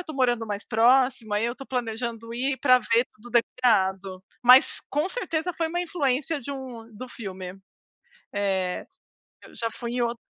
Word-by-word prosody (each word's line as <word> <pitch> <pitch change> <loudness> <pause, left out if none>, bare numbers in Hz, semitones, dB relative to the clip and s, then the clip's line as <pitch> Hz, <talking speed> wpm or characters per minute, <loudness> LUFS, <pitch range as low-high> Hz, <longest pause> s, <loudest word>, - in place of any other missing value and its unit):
estou 310 -4 -8
morando 240 -3 +2
mais 205 0 -4
próximo, 240 -1 +3
aí 210 - +1
eu 235 - 0
estou 270 +2 -10
planejando 230 -1 -4
ir 265 +3 0
pra 255 -1 +5
ver 235 +2 +2
tudo 240 +3 -14
decorado. 195 -6 +1 0.2
Mas 250 +2 +7
com 300 +5 0
certeza 360 -6 -2
foi 330 -1 0
uma 350 +2 -1
influência 295 -3 -1
de 275 - -7
um 240 -4 -8
do 255 +3 -7
filme. 190 -5 -7 0.8
Eh, 190 -3 -1 0.6
eu - - -15
já 230 -1 -2
fui 235 -1 -6
em 245 - 0
outro 235 0 -1
240 Hz, 170 wpm, -26 LUFS, 220-265 Hz, 0.8 s, Mas